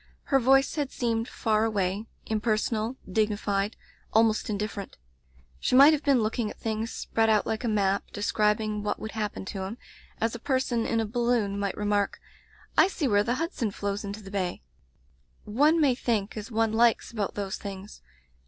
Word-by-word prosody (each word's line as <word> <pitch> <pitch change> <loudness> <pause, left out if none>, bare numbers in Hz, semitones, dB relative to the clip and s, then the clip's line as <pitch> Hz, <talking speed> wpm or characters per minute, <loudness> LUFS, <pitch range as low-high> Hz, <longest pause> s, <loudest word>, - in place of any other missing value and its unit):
Her 270 - +7
voice 270 +2 +4
had 290 -3 0
seemed 230 -1 -1
far 215 -1 0
away, 205 -1 -1 0.2
impersonal, 220 +2 0
dignified, 205 0 0 0.3
almost 220 0 +3
indifferent. 205 -1 -4 0.6
She - - +1
might 280 +4 +9
have 295 - 0
been 275 -5 +3
looking 215 0 -1
at - - -10
things 220 0 -2
spread 225 0 0
out 215 -1 +3
like 220 +1 -2
a - - 0
map, 200 -2 +1
describing 210 +1 0
what 210 - -2
would 220 - -6
hap 210 -2 -2
pen - - -6
to 195 0 -5
him, 210 +5 -6 0.4
as 225 0 0
a 235 - -5
person 260 -3 0
in 230 - +1
a 225 - +1
balloon 230 -3 0
might 200 -2 -2
remark, 205 -1 0 0.6
'I - - +7
see 340 -7 -2
where 205 -3 +3
the 240 +3 0
Hudson 325 - -2
flows 200 +1 -3
into 205 +1 -6
the 195 - -10
bay/ 185 - -2 0.8
''One 295 +10 +3
may 285 -5 +4
think 225 -5 -1
as 215 +1 -6
one 225 -1 +1
likes 230 0 +3
about 210 -4 -3
those 200 -1 -3
things. 200 0 -8
220 Hz, 180 wpm, -27 LUFS, 205-235 Hz, 0.8 s, might